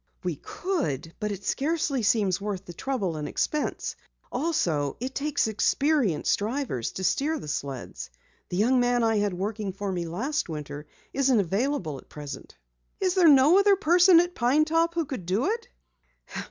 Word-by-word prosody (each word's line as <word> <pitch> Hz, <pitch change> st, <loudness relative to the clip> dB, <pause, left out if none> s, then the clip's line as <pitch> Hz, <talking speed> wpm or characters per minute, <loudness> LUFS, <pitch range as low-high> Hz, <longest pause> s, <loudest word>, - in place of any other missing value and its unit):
"We 175 Hz, -5 st, -2 dB
could, 170 Hz, -, -3 dB
but 210 Hz, -1 st, -2 dB
it 200 Hz, -1 st, -6 dB
scarcely 290 Hz, -2 st, 0 dB
seems 205 Hz, -4 st, +2 dB
worth 200 Hz, -2 st, -4 dB
the 175 Hz, -, -9 dB
trouble 195 Hz, -7 st, -2 dB
and 150 Hz, -1 st, -4 dB
expense. 300 Hz, -1 st, -2 dB, 0.4 s
Also, 175 Hz, -, 0 dB
it 255 Hz, +2 st, -4 dB
takes 285 Hz, -3 st, 0 dB
experienced 235 Hz, -, +1 dB
drivers 215 Hz, -, -2 dB
to 190 Hz, -, -5 dB
steer 295 Hz, -, +1 dB
the 155 Hz, -, -8 dB
sleds. 135 Hz, -, -5 dB, 0.4 s
The 180 Hz, -, -3 dB
young 245 Hz, +6 st, +3 dB
man 245 Hz, -1 st, +2 dB
I 225 Hz, -1 st, +2 dB
had 205 Hz, -3 st, 0 dB
working 205 Hz, +2 st, -3 dB
for 195 Hz, 0 st, -3 dB
me 175 Hz, -2 st, -3 dB
last 250 Hz, -, -2 dB
winter 150 Hz, -1 st, -6 dB, 0.3 s
isn't 265 Hz, -4 st, +3 dB
available 195 Hz, -, -1 dB
at -, -, -18 dB
present." 145 Hz, -, -9 dB, 0.4 s
"Is 370 Hz, -2 st, +1 dB
there 360 Hz, -4 st, +6 dB
no 290 Hz, +6 st, +7 dB
other 400 Hz, 0 st, +5 dB
person 355 Hz, 0 st, +6 dB
at 350 Hz, +1 st, +1 dB
Pine 270 Hz, +4 st, +3 dB
Top 330 Hz, +2 st, +1 dB
who 335 Hz, -2 st, 0 dB
could 245 Hz, -11 st, -6 dB
do 195 Hz, +7 st, +1 dB
it?" 455 Hz, +4 st, -2 dB
230 Hz, 165 wpm, -26 LUFS, 180-300 Hz, 0.4 s, no